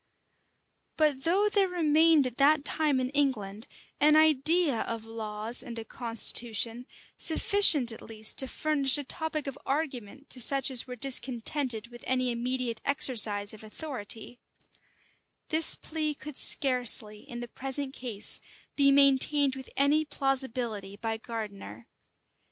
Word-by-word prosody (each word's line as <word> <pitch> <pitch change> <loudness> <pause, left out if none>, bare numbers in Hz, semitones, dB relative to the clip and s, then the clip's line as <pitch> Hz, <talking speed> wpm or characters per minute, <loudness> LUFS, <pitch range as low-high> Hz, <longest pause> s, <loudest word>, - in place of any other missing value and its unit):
[] - - -47
But 295 -4 0
though 385 +5 +1
there 405 -2 +1
remained 320 -3 +2
at 245 -1 -6
that 285 +1 +2
time 295 -3 0
in 255 0 -3
England 230 -8 -2 0.3
an 300 +1 +4
idea 310 -2 +3
of 230 -1 -6
laws 220 0 0
and 235 -1 -9
a 225 - -7
constitution, 230 0 -1 0.3
sufficient 320 - +3
at 225 - -10
least 220 -1 -2
to 265 - +2
furnish 285 -1 +1
a 290 - -5
topic 310 +1 -5
of 275 -2 -7
argument 275 -3 -5
to 250 - -3
such 270 +2 +5
as 255 -1 +2
were 250 - -8
discontented 250 -1 -1
with 240 0 -14
any 255 -1 0
immediate 240 -1 -3
exercise 215 -7 +1
of 215 - -13
authority; 230 -1 -8 1.1
this 320 0 +4
plea 310 -1 -4
could 300 0 -11
scarcely, 245 -8 +5
in 240 -2 -10
the 240 - -7
present 270 +2 -5
case, 230 -7 -3 0.4
be 280 -1 +3
maintained 275 0 +3
with 265 0 -11
any 290 +3 +2
plausibility 250 -8 -3
by 225 +1 -4
Gardiner. 200 - -9
260 Hz, 140 wpm, -27 LUFS, 230-290 Hz, 1.1 s, such